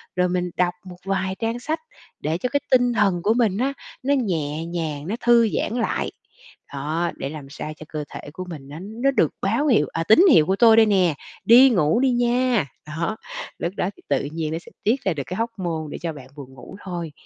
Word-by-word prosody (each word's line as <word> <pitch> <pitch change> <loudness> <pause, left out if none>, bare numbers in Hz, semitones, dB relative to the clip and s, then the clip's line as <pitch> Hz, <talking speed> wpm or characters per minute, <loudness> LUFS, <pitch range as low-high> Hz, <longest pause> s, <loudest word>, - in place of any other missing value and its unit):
rồi 180 0 +2
mình 180 0 -1
đọc 175 -1 +2
một 180 -1 -10
vài 190 -1 -1
trang 230 +1 -2
sách 310 +6 -2 0.4
để 155 +2 -1
cho 250 +8 -2
cái 285 - +1
tinh 245 -1 +4
thần 195 -5 +2
của 215 - +3
mình 225 -5 +1
á 265 +4 0 0.3
nó 280 +2 +2
nhẹ 165 - -1
nhàng, 160 -3 -4
nó 205 - -1
thư 235 -1 +5
giãn 215 - -2
lại. - - -1 0.6
Đó, 155 +5 -1
để 135 - -4
làm 145 -2 -9
sao 150 +2 -6
cho 155 - -10
cơ 155 -1 -4
thể 145 - -9
của 185 +2 -6
mình 145 -5 -8
nó 145 +3 -8
nó 225 +7 -1
được 165 - +2
báo 230 +10 +1
hiệu, 220 - +4
à, 165 - -1
"Tín 220 - +6
hiệu 155 - +6
của 190 +3 +1
tôi 225 +2 +6
đây 225 - +7
nè, 190 -6 +3 0.3
đi 250 +4 +8
ngủ 175 - +2
đi 265 0 +3
nha!" 245 - +2 0.2
Đó, 165 +8 -3 0.4
lúc 170 - -2
đó 180 - 0
thì - - -18
tự 140 0 +1
nhiên 160 -1 -2
nó 165 - -2
sẽ - - -16
tiết 235 +6 +1
ra 190 - +1
được 145 -3 -4
cái 185 +3 -5
hormone 175 -9 -3
để - - -5
cho 165 -1 -3
bạn 135 -4 -11
buồn 135 -3 -10
ngủ 130 +7 -12
thôi. 170 -4 -4
185 Hz, 230 wpm, -23 LUFS, 155-230 Hz, 0.6 s, đi